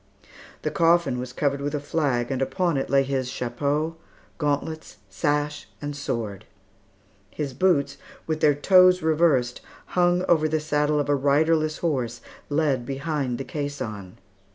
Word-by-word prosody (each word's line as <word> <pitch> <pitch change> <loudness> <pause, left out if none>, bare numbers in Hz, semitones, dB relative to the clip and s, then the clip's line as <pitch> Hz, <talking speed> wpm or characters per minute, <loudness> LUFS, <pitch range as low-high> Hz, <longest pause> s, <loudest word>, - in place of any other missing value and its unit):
The 155 - -1
coffin 165 -4 +3
was 125 0 -5
covered 140 +2 -1
with 145 +1 -2
a - - -1
flag, 140 -5 -1
and 135 -1 -2
upon 175 +4 0
it 135 - -2
lay 135 0 +4
his 130 -2 -2
chapeau, 145 +7 -2 0.4
gauntlets, 150 +1 -2
sash, 145 +8 -1
and 145 0 -5
sword. 110 -7 -4 0.8
His 140 +3 -4
boots, 150 0 +1 0.3
with 155 -1 -2
their 145 -2 +4
toes 185 +3 +5
reversed, 155 -6 +2 0.3
hung 180 0 +3
over 155 -2 +3
the 155 +1 +1
saddle 150 0 +1
of 145 - -1
a 145 - +2
riderless 155 +3 +2
horse, 125 -8 -2 0.3
led 145 -4 +1
behind 135 -1 -2
the - - -4
caisson. 115 -11 -5
145 Hz, 145 wpm, -24 LUFS, 135-155 Hz, 0.8 s, toes